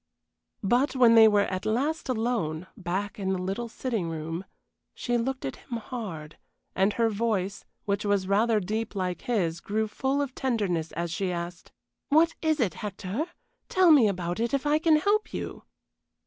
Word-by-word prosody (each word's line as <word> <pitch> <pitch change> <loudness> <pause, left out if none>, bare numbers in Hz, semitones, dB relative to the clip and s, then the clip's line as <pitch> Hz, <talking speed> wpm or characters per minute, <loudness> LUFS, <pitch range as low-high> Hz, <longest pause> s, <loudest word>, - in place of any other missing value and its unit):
But 245 +8 +2
when 245 -3 +6
they 225 -1 +9
were 205 -1 +4
at 185 -1 -3
last 275 +8 -1
alone, 220 -10 -1
back 200 +1 -3
in 190 -1 0
the - - -1
little 195 +6 -3
sitting 225 -8 -2
room, 165 +3 -4 0.5
she 245 - -1
looked 255 +3 -1
at 135 - -4
him 235 - -6
hard, 200 -10 -7 0.4
and 195 +2 +3
her 230 -1 +2
voice, 205 -3 -1 0.2
which 200 0 0
was 200 -2 +1
rather 215 +3 +3
deep 215 +3 -3
like 185 -2 -2
his, 175 -9 0
grew 215 +4 -1
full 265 +6 -1
of 280 -3 -2
tenderness 200 -12 -1
as 170 +1 -3
she 185 +3 -1
asked: 175 0 -6 0.4
"What 325 +3 +4
is 315 -1 +1
it, 220 -8 +1
Hector? 205 - -4 0.4
Tell 370 -2 +5
me 270 -8 +7
about 180 -2 -2
it 235 +4 +1
if 275 - -2
I 295 +1 +3
can 325 -1 +4
help 410 +7 +1
you." - - -6
215 Hz, 175 wpm, -27 LUFS, 185-250 Hz, 0.5 s, they